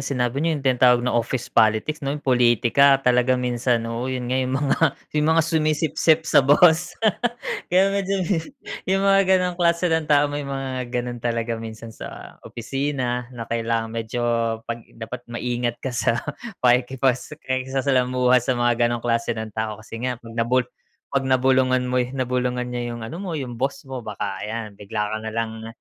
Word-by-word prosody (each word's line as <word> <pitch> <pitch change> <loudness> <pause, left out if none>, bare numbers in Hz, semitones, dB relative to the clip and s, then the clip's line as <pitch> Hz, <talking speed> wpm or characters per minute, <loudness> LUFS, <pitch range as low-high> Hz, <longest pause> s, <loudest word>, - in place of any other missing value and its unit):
sinabi 125 +1 0
niyo 165 +1 +1
yung 140 - -6 0.2
tawag 125 -1 +5
ng 125 - 0
office 120 +1 -1
politics 110 +7 +2
no 140 0 -2
politika 125 +2 +4
talaga 125 +1 +3
minsan 125 -1 0
oo 115 +2 -3
yun 125 -1 -3
nga 130 - +2
yung 130 0 -1
mga 140 0 +2 0.2
yung 150 0 +1
mga 160 +1 +4
sumisipsip 160 0 +2
sa - - +5
boss. 160 +5 +4 0.7
Kaya 190 +2 +3
medyo 195 -1 0 0.6
yung 195 +1 +2
mga 195 -1 +4
ganong 180 -1 -1
klase 170 0 +2
ng 160 -1 +1
tao 145 -1 +3
may 145 -1 -4
mga 135 -2 -4
ganon 120 0 -3
talaga 115 -1 -2
minsan 115 0 -8
sa - - -10
opisina 125 0 -2
na 115 - -5
kailangan 115 -1 -2
medyo 115 +1 -3 0.4
pag 115 0 -5 0.2
dapat 115 +2 -8
maingat 120 0 -2
ka 130 - -2
sa 115 -1 +1 0.5
pakikipas 125 +3 +2
pakikisalamuha 130 -1 +2
sa 125 +1 -1
mga 120 0 +2
ganong 120 -1 -3
klase 115 -1 0
ng 110 -1 -5
tao 110 0 -3
kasi 115 0 -8
nga 125 +1 -2
pag 115 -1 -13
na 115 0 -1
bulu 125 +1 +3 0.5
pag-na-bulungan 130 -1 +2
mo 125 - +2
na-bulungan 125 -1 -1
niya 120 -1 -3
yung 120 - -7
ano 120 +10 -6
mo 185 -4 -4
yung 125 -5 -5
boss 135 +2 -2
mo 135 -2 -6
baka 105 -4 -5
ay 110 -1 -4
bigla 105 +1 -3
ka 110 - -1
nalang, 110 0 -4
125 Hz, 165 wpm, -23 LUFS, 115-140 Hz, 0.7 s, tawag